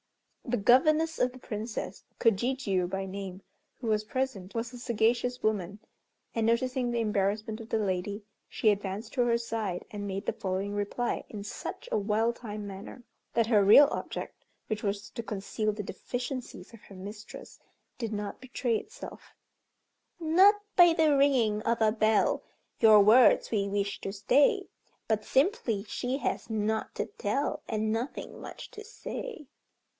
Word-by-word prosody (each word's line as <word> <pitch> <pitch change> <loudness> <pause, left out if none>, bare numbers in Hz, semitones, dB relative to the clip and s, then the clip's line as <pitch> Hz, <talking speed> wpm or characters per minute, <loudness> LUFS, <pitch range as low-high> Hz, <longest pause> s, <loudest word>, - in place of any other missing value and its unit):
The 245 0 -1
governess 310 +9 +4
of 250 - +2
the 255 - -13
Princess, 220 -1 -5 0.2
Kojijiû 225 -5 +1
by 195 +1 -3
name, 190 -1 -6 0.4
who 240 - -5
was 215 -1 +2
present, 215 -5 -3
was 230 +2 -3
a 245 - -8
sagacious 240 +1 +1
woman, 205 -2 -1 0.5
and 225 -1 0
noticing 250 +2 +1
the 235 0 0
embarrassment 215 +1 -1
of 225 - -11
the - - +1
lady, 200 0 -2 0.3
she 220 - +2
advanced 205 +2 -2
to 255 - +1
her 235 -1 +3
side, 220 -6 -3
and 205 -1 -5
made 195 +1 -4
the - - 0
following 195 -1 -3
reply 205 +4 -2
in 205 -2 -7
such 210 - -6
a 215 - +2
well 215 +3 +1
timed 210 -3 -7
manner 200 +5 -9 0.3
that 230 - +4
her 215 -4 +4
real 220 +9 +8
object, - - -5 0.2
which 215 -1 -2
was 200 0 -3
to 235 - -5
conceal 215 +1 -2
the 210 0 -5
deficiencies 245 +4 -6
of 230 - -13
her 195 - -14
mistress, 205 +3 -10 0.4
did 230 -3 -3
not 205 -1 -4
betray 250 -2 -1
itself 455 - -10 0.8
"Not 360 +6 +6 0.2
by 345 -2 +8
the 315 -3 +4
ringing 250 -7 +3
of 230 +1 0
a 220 -1 +4
bell, 215 -1 +2 0.4
Your 215 -1 +8
words 225 +4 +6
we 200 -3 +1
wish 200 0 -2
to 195 - -3
stay; 285 - +3 0.4
But 215 -1 +1
simply, 265 - +1
she 245 +4 -3
has 280 - -3
nought 220 0 -1
to - - -1
tell, 240 +8 -2
And 215 0 0
nothing 235 +5 -4
much - - -9
to 425 - -9
say." 450 -4 -7
220 Hz, 160 wpm, -29 LUFS, 205-245 Hz, 0.8 s, real